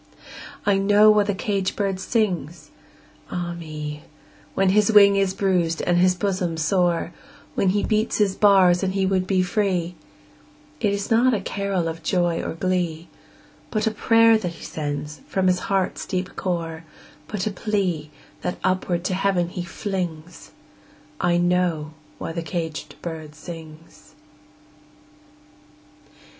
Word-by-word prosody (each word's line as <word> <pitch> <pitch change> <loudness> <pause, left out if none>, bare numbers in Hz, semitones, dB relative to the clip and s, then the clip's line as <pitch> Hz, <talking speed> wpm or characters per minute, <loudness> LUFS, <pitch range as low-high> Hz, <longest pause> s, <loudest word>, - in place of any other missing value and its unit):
I 200 -1 +3
know 205 +2 +6
why 210 0 +4
the 205 -1 -1
caged 195 -1 -1
bird 195 -2 -1
sings, 185 - -2 0.6
ah 175 -1 -3
me, 150 -3 -6 0.5
When 195 -1 +3
his 210 +2 +4
wing 200 -2 +7
is 195 -1 +1
bruised 180 -4 +1
and 175 0 +2
his 180 0 +4
bosom 185 -3 -1
sore, 175 +1 +1 0.4
When 195 - +2
he 205 +2 +1
beats 215 0 +1
his 205 -3 +2
bars 190 -4 +5
and 190 0 -1
he 195 -1 +2
would 185 -1 +1
be 185 -2 +2
free; 180 -2 0 0.9
It 210 -3 +1
is 200 +1 -3
not 240 +2 +4
a - - -1
carol 195 -3 -2
of 165 0 -5
joy 175 0 +1
or - - -4
glee, 175 -2 -1 0.6
But 215 -1 -1
a 220 - +2
prayer 225 +1 +4
that 180 -5 -4
he - - -13
sends 150 0 -4
from 190 -1 0
his 180 0 +3
heart's 195 -2 0
deep 185 -1 -3
core, 165 -3 -3 0.4
But 200 -3 -3
a 215 - -1
plea, 185 -7 -1 0.3
that 180 - -3
upward 185 -2 0
to 185 - -1
Heaven 185 -2 +1
he 180 - -5
flings 175 -3 -5 0.7
I 175 -1 +2
know 175 -3 +1 0.2
why - - -5
the 170 +1 -3
caged 165 -2 -5
bird 160 -3 -6
sings! 160 0 -12
185 Hz, 145 wpm, -23 LUFS, 170-200 Hz, 0.9 s, wing